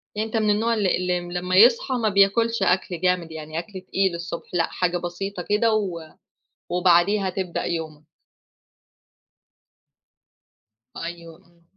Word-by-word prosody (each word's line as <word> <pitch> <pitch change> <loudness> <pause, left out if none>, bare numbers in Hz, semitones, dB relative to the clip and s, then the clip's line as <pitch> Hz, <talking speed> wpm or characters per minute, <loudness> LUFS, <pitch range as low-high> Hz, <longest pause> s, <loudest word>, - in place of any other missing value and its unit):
يعني 215 +1 -1
أنت 225 +1 -2
من 215 -1 +1
النوع 225 +3 +2
اللي 205 -5 +1
اللي 180 0 -1 0.2
لما 180 +1 -2
يصحى 235 +5 +5
ما 230 -3 +1
بياكلش 205 +3 +3
أكل 180 -2 0
جامد، 180 -2 0
يعني 155 0 -5
أكل 190 0 -8
تقيل 190 -1 0
الصبح 170 0 -7
لأ، 170 -1 +1
حاجة 180 -1 0
بسيطة 175 +1 -5
كده 220 +2 +3
و 195 -6 -1 0.7
وبعديها 180 +3 +3
تبدأ 185 -1 -3
يومك. 155 -3 -4 2.9
أيوه، 170 -1 -7
إمم. 170 0 -28
185 Hz, 135 wpm, -23 LUFS, 170-210 Hz, 2.9 s, يصحى